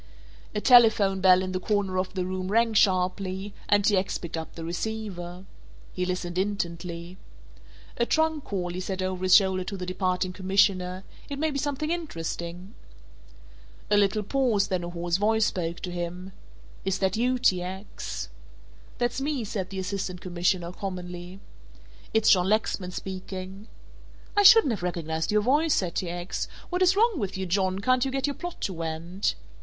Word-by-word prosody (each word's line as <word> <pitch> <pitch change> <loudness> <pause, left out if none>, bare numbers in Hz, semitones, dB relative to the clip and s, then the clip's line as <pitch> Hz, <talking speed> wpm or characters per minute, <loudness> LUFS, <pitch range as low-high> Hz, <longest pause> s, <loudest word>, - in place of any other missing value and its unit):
A - - +1
telephone 220 -6 +6
bell 185 0 +6
in 185 - -3
the 185 - -1
corner 195 -1 0
of 185 +1 -3
the 185 -1 -1
room 185 0 -3
rang 230 +3 +2
sharply, 190 0 +1 0.2
and 205 -1 +4
T. 210 - +4
X. 190 +1 0
picked 170 -1 -6
up 160 0 -6
the 165 - -6
receiver. 180 -1 -5 0.5
He 180 0 -2
listened 180 -1 -2
intently. 175 -3 -3 0.8
"A 235 - +1
trunk 315 -2 +1
call," 180 -3 -2
he 180 - -4
said 185 0 -3
over 185 -1 -3
his 185 0 +6
shoulder 190 -2 +4
to 195 - -5
the 180 - -4
departing 185 0 -1
commissioner, 185 -1 +1 0.3
"it 280 - -4
may 315 +2 0
be 280 - -2
something 295 +2 -2
interesting." 180 - -5 1.2
A - - +6
little 205 +1 +2
pause; 225 -3 +1
then 185 -2 -1
a 175 - -4
hoarse 175 0 -1
voice 220 +2 +3
spoke 170 -5 -2
to 180 - -4
him. 175 +2 -5 0.5
"Is 195 0 0
that 190 +1 0
you, 250 +3 +1
T. 185 -7 +3
X.?" 190 +3 -6 0.7
"That's 245 +1 -1
me," 280 -3 -1
said 195 -3 -4
the 195 - -7
Assistant 185 -1 -3
Commissioner, 175 0 -1
commonly. 180 -1 -6 0.7
"It's 220 -1 +4
John 185 -1 +4
Lexman 210 -3 0
speaking." 190 +2 -7 0.7
"I 410 - +5
shouldn't 405 - +8
have 205 - -5
recognized 160 -2 -2
your 210 0 +3
voice," 295 +6 +3
said 180 -3 -1
T. 180 - -2
X., 175 +1 -3 0.2
"what 360 +1 -1
is 370 +1 +5
wrong 440 -4 +3
with 195 -3 -3
you, 190 - -2
John, 185 +1 +1
can't 250 +5 +2
you 270 - 0
get 265 0 -1
your 285 - -1
plot 350 +4 -7
to 190 - -1
went?" 165 +3 -2
190 Hz, 175 wpm, -27 LUFS, 180-220 Hz, 1.2 s, shouldn't